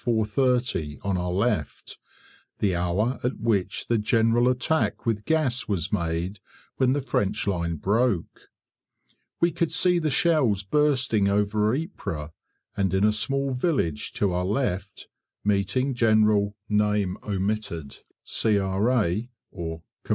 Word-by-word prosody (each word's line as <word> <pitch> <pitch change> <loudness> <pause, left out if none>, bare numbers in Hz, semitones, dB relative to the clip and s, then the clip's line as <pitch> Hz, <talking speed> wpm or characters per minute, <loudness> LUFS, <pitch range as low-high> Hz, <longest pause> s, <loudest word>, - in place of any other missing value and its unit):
30 120 - 0
on 100 -1 0
our 90 0 -2
left, 95 - -2 0.6
the 100 -3 +1
hour 95 +8 0
at 125 - -1
which 105 -5 0
the 115 -2 +1
general 115 +3 +3
attack 130 +6 0
with 110 -2 -1
gas 150 -6 +1
was 95 -6 -2
made 85 +4 -2 0.4
when 130 -1 +3
the 145 - 0
French 105 -7 -1
line 85 -4 -1
broke. 105 - -1 0.9
We 170 0 +3
could 170 0 -1
see 180 -1 +3
the 155 -2 0
shells 130 - +2
bursting 130 -4 +2
over 105 +2 +1
Ypres, 100 - -5 0.4
and 95 -2 0
in 95 - +2
a 105 - +5
small 135 +5 0
village 125 - -1
to 100 -3 0
our 90 +1 0
left, 100 -2 -2 0.4
meeting 105 +7 +1
General, 110 -3 +3 1.7
C.R. 105 +1 +1
110 Hz, 115 wpm, -25 LUFS, 95-125 Hz, 1.7 s, a